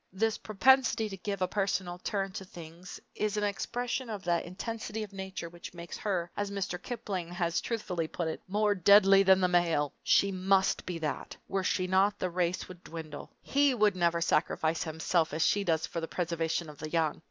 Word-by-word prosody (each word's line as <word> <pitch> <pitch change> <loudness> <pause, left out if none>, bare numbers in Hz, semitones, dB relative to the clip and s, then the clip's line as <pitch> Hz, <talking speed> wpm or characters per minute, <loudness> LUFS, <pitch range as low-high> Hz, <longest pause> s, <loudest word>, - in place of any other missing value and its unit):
This 220 +4 0
propensity 225 +1 +3
to 195 - -7
give 200 0 -3
a - - +2
personal 190 -2 -1
turn 195 +1 -2
to 190 - -6
things 170 0 -10
is 215 0 -1
an 210 - 0
expression 240 +4 -2
of 205 -3 -5
that 170 -1 0
intensity 220 +4 -5
of 205 -1 -10
nature 190 -3 -5
which 175 +1 -10
makes 170 0 -7
her, 175 -4 -2
as 205 0 -2
Mr. 195 -2 -3
Kipling 200 -8 -4
has 175 -1 -1
truthfully 180 -8 -2
put 170 +1 -3
it, 160 - -4
"more 210 +2 +2
deadly 195 +1 +6
than 190 -1 +5
the 180 - +4
male!" 170 -5 +2
She 200 - +4
must 190 +1 +2
be 180 -2 -3
that 155 -2 -4
were 195 -1 -1
she 185 0 +1
not, 195 +2 +3
the 185 -2 -2
race 180 0 -1
would 180 -1 -12
dwindle. 155 -3 -8
He 280 -1 +3
would 210 -4 +3
never 170 -1 +1
sacrifice 160 0 +1
himself 160 0 0
as 160 - +2
she 205 - +2
does 160 -3 +1
for 170 - -4
the 165 - -3
preservation 165 -1 -2
of 150 -2 -11
the 155 - -5
young! 160 -2 0
185 Hz, 200 wpm, -30 LUFS, 170-205 Hz, -, deadly